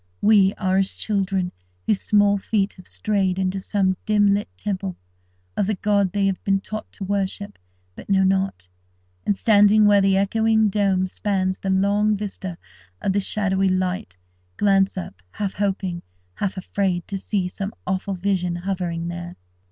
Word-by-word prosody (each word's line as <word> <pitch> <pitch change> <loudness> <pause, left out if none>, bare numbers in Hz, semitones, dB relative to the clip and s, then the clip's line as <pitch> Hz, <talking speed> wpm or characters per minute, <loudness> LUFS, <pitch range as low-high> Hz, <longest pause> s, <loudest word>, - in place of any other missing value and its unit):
We 205 -2 +5
are 190 -1 0
as 195 - 0
children 195 -3 -1 0.3
whose 205 - +1
small 205 -1 +3
feet 200 0 0
have 185 - -15
strayed 195 -3 0
into 190 0 -1
some 190 -1 0
dim 210 -1 +4
lit 205 +1 -1
temple 195 -3 -3 0.6
of 195 - 0
the 215 - 0
god 200 -1 +1
they 200 0 +1
have 195 -1 -1
been 195 -1 +2
taught 215 +2 -7
to 200 - -7
worship 200 +1 -2 0.4
but - - -12
know 190 -1 +4
not; 190 - 0 0.6
and, 200 - +2
standing 210 0 +5
where 205 -1 +6
the 195 0 +3
echoing 220 +2 +3
dome 195 -2 +1
spans 185 -1 -1
the 195 - -3
long 200 +2 +2
vista 195 -3 -5 0.4
of 195 - 0
the 200 - +2
shadowy 195 -1 +1
light, 185 - -2 0.4
glance 195 -1 +3
up, 100 - -7
half 200 -2 -3
hoping, 190 -3 -2 0.3
half 195 - -3
afraid 185 -2 -1
to 195 -2 -4
see 195 -1 -1
some 195 +2 -5
awful 190 +1 -2
vision 180 -2 0
hovering 175 -2 -3
there. 175 0 -6
195 Hz, 160 wpm, -23 LUFS, 185-205 Hz, 0.6 s, where